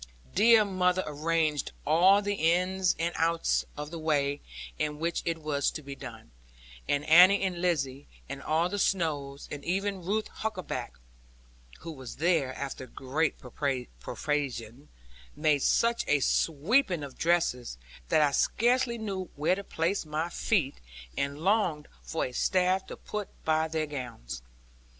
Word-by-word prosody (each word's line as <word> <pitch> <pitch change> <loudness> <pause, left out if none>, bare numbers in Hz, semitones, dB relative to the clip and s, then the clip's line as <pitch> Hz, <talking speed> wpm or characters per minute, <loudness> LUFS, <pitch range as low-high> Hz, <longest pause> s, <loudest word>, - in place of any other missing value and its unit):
Dear 225 -1 +6
mother 185 -1 +1
arranged 155 -1 0
all 185 +7 +5
the 205 0 0
ins 180 +1 +2
and 170 +1 -1
outs 165 +1 +1
of 150 +1 -6
the 170 - -6
way 145 -2 0 0.4
in 150 -1 -1
which 165 +2 -1
it 165 -1 0
was 145 -2 +1
to 155 - -7
be 140 0 -7
done; - - -10 0.6
and 145 +1 +1
Annie 180 +5 +7
and 180 -2 -1
Lizzie, 140 -6 -1 0.2
and 140 0 -6
all 160 +4 +1
the 200 +3 -3
Snowes, 145 -8 -1
and 145 -1 -6
even 195 +1 -1
Ruth 215 +4 -1
Huckaback 185 - -4 0.9
(who 165 - -6
was 130 -5 -9
there, 160 -4 +2
after 135 -2 -5
great 140 +5 -1 0.6
persuasion), 135 - -3 0.5
made 150 -2 +2
such 235 - +2
a 145 - +3
sweeping 170 - +2
of 140 -2 -8
dresses 160 - 0 0.3
that 155 - +4
I 145 - +3
scarcely 240 - +2
knew 195 -4 -4
where 150 +5 +2
to 200 +2 -3
place 175 +2 -1
my 155 +2 -2
feet, 170 -6 0 0.4
and 140 +1 -2
longed 180 -6 +1
for 165 - -2
a 125 - -5
staff, 185 +7 +1
to - - -8
put 210 -2 -5 0.2
by 160 0 +2
their 160 -1 -1
gowns. 125 - -6
160 Hz, 145 wpm, -29 LUFS, 145-185 Hz, 0.9 s, Annie